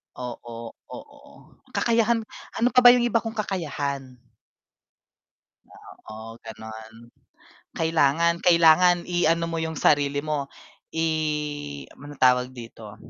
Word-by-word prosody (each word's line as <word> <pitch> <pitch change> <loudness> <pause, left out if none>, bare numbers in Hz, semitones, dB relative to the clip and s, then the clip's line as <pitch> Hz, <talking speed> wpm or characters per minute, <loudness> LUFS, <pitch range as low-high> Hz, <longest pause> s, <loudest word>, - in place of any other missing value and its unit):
Oo, 115 -2 -8 0.2
oo. - - -12 0.6
Kakayahan, 230 -1 +2 0.3
ano 240 +2 +2
pa 255 - +5
ba 245 0 +9
yung 240 - +1
iba 235 -1 +2
kung 225 0 -6
kakayahan? 145 -10 -4 2.0
Oo, 110 +1 -9
ganun. 110 0 -10 0.8
Kailangan 165 +1 +2
kailangan 175 0 +6
i-ano 170 -1 +1
mo 165 - -3
yung 160 -1 -4
sarili 145 -1 +2
mo, 145 -3 -2 0.5
i 160 0 0 0.9
ano 145 +1 -10
tawag 125 0 +3
dito. 115 -3 -11
155 Hz, 105 wpm, -24 LUFS, 125-175 Hz, 2.0 s, ba